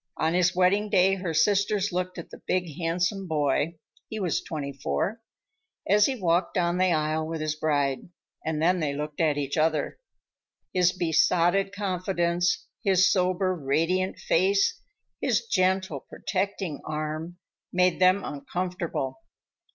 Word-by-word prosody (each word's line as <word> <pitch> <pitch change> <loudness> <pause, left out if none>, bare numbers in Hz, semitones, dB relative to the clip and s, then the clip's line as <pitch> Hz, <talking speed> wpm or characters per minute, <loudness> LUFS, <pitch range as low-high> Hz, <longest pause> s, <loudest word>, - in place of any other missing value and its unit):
On 160 +1 +1
his 180 0 +2
wedding 195 +3 +3
day 195 -1 +4
her 185 -3 -2
sisters 200 +4 +2
looked 180 0 -2
at 170 - -8
the - - -11
big, 180 -5 -1
handsome 175 +3 -1
boy—he 155 +6 -2
was 180 -5 0
twenty 140 -3 -5
four—as 220 - -2
he 270 - -1
walked 175 -1 +1
down 175 0 +1
the 185 -1 +3
aisle 155 0 0
with 165 0 -4
his 155 0 -1
bride, 145 -2 -1 0.3
and 155 -1 -2
then 180 +3 +3
they 145 -3 -1
looked 150 +2 -4
at 155 -3 +2
each 140 0 -2
other. 155 -1 0 0.7
His 180 -1 +4
besotted 175 +2 +2
confidence, 180 -3 0 0.2
his 190 -1 +4
sober, 185 0 +1
radiant 165 +6 0
face, 195 +3 +2 0.4
his - - +1
gentle, 185 - +1
protecting 190 -1 -3
arm, 155 +3 -4 0.3
made 180 -1 +2
them 185 +2 +4
uncomfortable. 150 -3 -4
175 Hz, 135 wpm, -26 LUFS, 155-190 Hz, 0.7 s, day